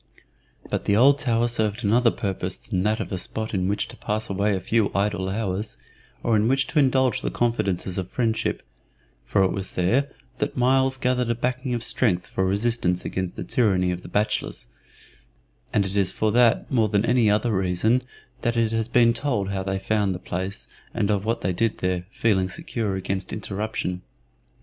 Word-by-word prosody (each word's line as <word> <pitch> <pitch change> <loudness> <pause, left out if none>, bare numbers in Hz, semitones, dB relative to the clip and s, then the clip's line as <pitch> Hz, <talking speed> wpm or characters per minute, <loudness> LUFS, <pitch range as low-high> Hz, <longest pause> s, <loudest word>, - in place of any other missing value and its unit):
But - - -3
the 100 - +3
old 140 +5 +5
tower 120 -3 +2
served 110 -1 0
another 115 +4 +4
purpose 95 -4 -1
than 95 -4 -3
that 105 +3 +1
of - - -4
a 95 - -2
spot 110 +4 -3
in 95 -2 0
which 100 +1 -1
to - - -9
pass 110 +1 -2
away 100 +1 +1
a - - -1
few 110 +3 +1
idle 100 -1 0
hours, 100 - -3 0.5
or 115 - +2
in 105 +1 +3
which 135 +1 +2
to 155 - +2
indulge 130 -2 +3
the - - -1
confidences 100 -6 -1
of 95 -1 -5
friendship, 115 -3 -1 0.6
for 100 - +3
it 95 - +2
was 95 -1 -4
there 120 +11 +2 0.3
that - - -2
Myles 130 +1 +3
gathered 125 -2 0
a 115 - +1
backing 125 +1 -2
of 120 - -3
strength 90 -10 +1
for 95 - -2
resistance 100 -2 +1
against 95 -2 -3
the - - -5
tyranny 95 -7 +2
of 90 0 -4
the - - -11
bachelors, 105 +1 -1 1.1
and 100 - +2
it 95 +1 -4
is 95 -3 +2
for 110 -1 0
that 120 0 +3
more 115 -5 +2
than 100 0 +2
for - - -1
any 120 -4 +4
other 105 +2 +1
reason 95 +6 +2 0.4
that 120 -1 0
it 115 -1 +2
has 115 0 0
been 120 -1 +4
told 115 -6 -1
how 95 -1 -2
they 95 0 -2
found 100 -1 0
the - - -6
place 95 +3 -4 0.3
and 105 -3 +1
of 100 -1 0
what 115 +1 -1
they 95 - 0
did 110 +4 0
there, 90 -1 -2
feeling 95 -5 +1
secure 105 +1 -3
against 95 0 -3
interruption. 100 -3 -3
105 Hz, 195 wpm, -24 LUFS, 95-120 Hz, 1.1 s, old